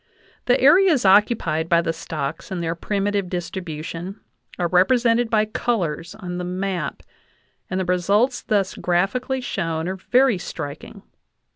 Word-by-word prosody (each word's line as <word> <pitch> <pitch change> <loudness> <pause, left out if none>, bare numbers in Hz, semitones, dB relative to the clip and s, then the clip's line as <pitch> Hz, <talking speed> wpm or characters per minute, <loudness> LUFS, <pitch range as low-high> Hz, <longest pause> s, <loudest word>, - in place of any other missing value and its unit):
The 250 - +3
areas 305 - +5
occupied 190 -5 +3
by 170 -1 +4
the 165 - -1
stocks 160 -2 -5
in 190 -2 -4
their 165 -1 -1
primitive 200 +1 -1
distribution 175 +1 -5 0.4
are 175 - 0
represented 230 +6 +3
by 215 -1 +3
colors 180 -7 -2
on 180 -4 -6
the - - -3
map, 180 -4 -3 0.7
and 185 - -2
the 185 - -1
results 200 +8 +1
thus 200 -4 0
graphically 205 +9 -1
shown 165 -7 -2
are 190 +1 -3
very 250 +1 +2
striking. 145 -4 -7
185 Hz, 135 wpm, -22 LUFS, 170-220 Hz, 0.7 s, areas